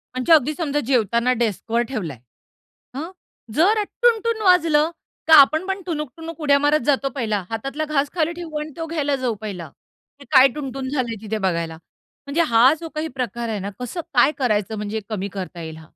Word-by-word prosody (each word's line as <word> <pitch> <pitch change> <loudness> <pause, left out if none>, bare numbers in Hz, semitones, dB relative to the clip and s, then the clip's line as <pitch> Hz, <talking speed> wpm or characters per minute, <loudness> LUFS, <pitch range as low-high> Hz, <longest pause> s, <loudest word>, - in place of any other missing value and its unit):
म्हणजे, 255 +6 +3
अगदी 305 -1 +4
समजा 295 -4 -1
जेवताना 235 -1 +2
डेस्क 225 -1 -2
वर 235 +1 +3
ठेवलाय. 175 - -4 0.8
हं, 320 +5 -4 0.5
जरा 420 +7 +3 0.2
टुन-टुन 460 -1 +2
वाजलं, 330 -4 +4 0.4
तर 320 - +6
आपण 315 +4 +7
पण 385 0 -2
टुणूक-टुणूक 325 +1 -5
उड्या 280 -2 +4
मारत 290 -2 +2
जातो 275 -1 +2
पहिला. 215 -6 -1
हातातला 275 +7 -3
घास 290 -2 0
खाली 330 -1 +1
ठेवू 330 -3 -6
आणि 300 - -5
तो 325 - -3
घ्यायला 290 -3 0
जाऊ 230 -3 0
पहिला, 185 -7 -6 0.5
की 280 - -13
काय 265 -1 +8
टुन-टुन 270 -2 -5
झालंय 255 -5 -2
तिथे 220 0 -3
बघायला 165 -2 -2 0.5
म्हणजे 300 +4 +1
हा 240 +5 +6
जो 330 - -7
काही 310 +1 -2
प्रकार 235 -2 -3
आहे 210 -2 -2
ना, 195 - -4
कसं, 250 +8 -4
काय 255 +4 +5
करायचं, 220 -5 0
म्हणजे 210 +1 -3
कमी 200 -2 -3
करता 180 -2 -6
येईल 160 -1 -7
हा? 160 0 -14
275 Hz, 185 wpm, -22 LUFS, 220-310 Hz, 0.8 s, काय